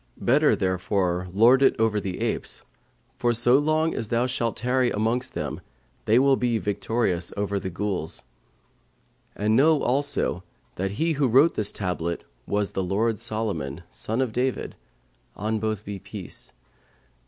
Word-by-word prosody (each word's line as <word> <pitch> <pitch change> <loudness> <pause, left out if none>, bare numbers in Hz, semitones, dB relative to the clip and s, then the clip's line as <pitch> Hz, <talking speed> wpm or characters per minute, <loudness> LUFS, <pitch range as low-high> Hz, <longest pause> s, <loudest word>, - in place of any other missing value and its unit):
Better 145 +5 +3
therefore 95 -1 0
lord 115 +7 +5
it 135 - +5
over 110 -2 +2
the 95 -3 -5
apes, - - -2 0.5
for 120 0 +2
so 120 +3 +5
long 155 +2 +1
as 115 - -3
thou 120 +2 +1
shalt 120 -3 -1
tarry 125 +2 +2
amongst 115 +4 -1
them - - -4 0.4
they 110 - +4
will 135 +1 +5
be 120 -2 0
victorious 105 -4 -1
over 100 0 -1
the 95 - -4
Ghuls. 95 -3 -3 1.1
And 105 +2 +1
know 150 +4 +4
also 135 -8 0 0.3
that 95 +1 -3
he 165 +10 0
who 140 -2 +1
wrote 135 +8 +5
this 105 -1 0
tablet 85 -3 -3 0.2
was 105 -1 0
the 95 - -2
lord 105 +4 0
Solomon, 85 -9 -3
son 115 +4 -2
of 125 -4 -1
David 130 +2 -1 0.6
(on 110 +2 -1
both 110 -1 -2
be 100 -1 -5
peace!).' 100 -1 -9
110 Hz, 150 wpm, -25 LUFS, 100-125 Hz, 1.1 s, lord